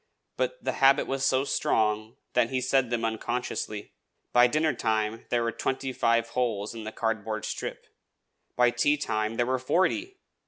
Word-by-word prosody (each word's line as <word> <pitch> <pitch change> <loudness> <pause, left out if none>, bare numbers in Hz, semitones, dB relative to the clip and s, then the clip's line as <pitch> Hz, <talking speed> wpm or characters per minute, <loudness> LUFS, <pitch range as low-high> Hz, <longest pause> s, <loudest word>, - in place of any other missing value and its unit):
But - - -2
the - - 0
habit 135 +1 +6
was 135 0 -2
so 130 0 +2
strong 110 -4 0 0.2
that 120 -2 +3
he 130 - 0
said 130 0 +2
them 115 -1 -1
unconsciously. 110 -2 -3 0.4
By 120 0 +7
dinnertime 115 -7 0
there 120 -1 +1
were 115 - 0
twenty 130 +1 -2
five 115 -1 +2
holes 115 -5 -1
in 115 -2 -7
the 110 - -4
cardboard 110 -1 -2
strip; - - -5 0.7
by 125 0 +4
tea 145 +5 +2
time 110 -6 -1
there 120 - +1
were 130 +1 0
forty! 305 - 0
120 Hz, 160 wpm, -27 LUFS, 110-130 Hz, 0.7 s, By